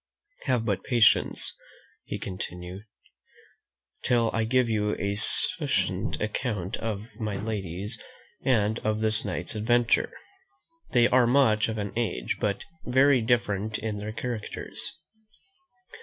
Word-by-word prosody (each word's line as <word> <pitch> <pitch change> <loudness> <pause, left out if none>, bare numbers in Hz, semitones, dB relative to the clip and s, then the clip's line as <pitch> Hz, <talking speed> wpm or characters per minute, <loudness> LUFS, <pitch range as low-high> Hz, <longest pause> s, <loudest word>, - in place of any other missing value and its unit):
Have 125 -5 +1
but 100 -4 -1
patience," 120 -5 +3 0.7
continued 90 0 -6 1.2
he, - - -3
"till 115 -2 +2
I 115 -1 0
give 125 +1 +2
you 105 -2 0
a 100 +1 -1
succinct 110 - +3
account 105 -3 -2
of 110 -1 -4
my 105 -3 -3
ladies 100 0 -4 0.4
and 110 -4 +1
of 110 0 -1
this 110 0 +3
night's - - -2
adventure. 115 +2 +2 0.8
They 120 -2 +4
are 125 -1 +4
much 115 -5 +3
of 110 - -3
an 100 -1 -4
age, 110 - -2
but 100 -1 -1 0.2
very 130 +1 +4
different 110 -3 0
in 110 -2 -4
their 105 +1 -5
characters. 120 -1 -4
110 Hz, 120 wpm, -27 LUFS, 105-120 Hz, 1.2 s, They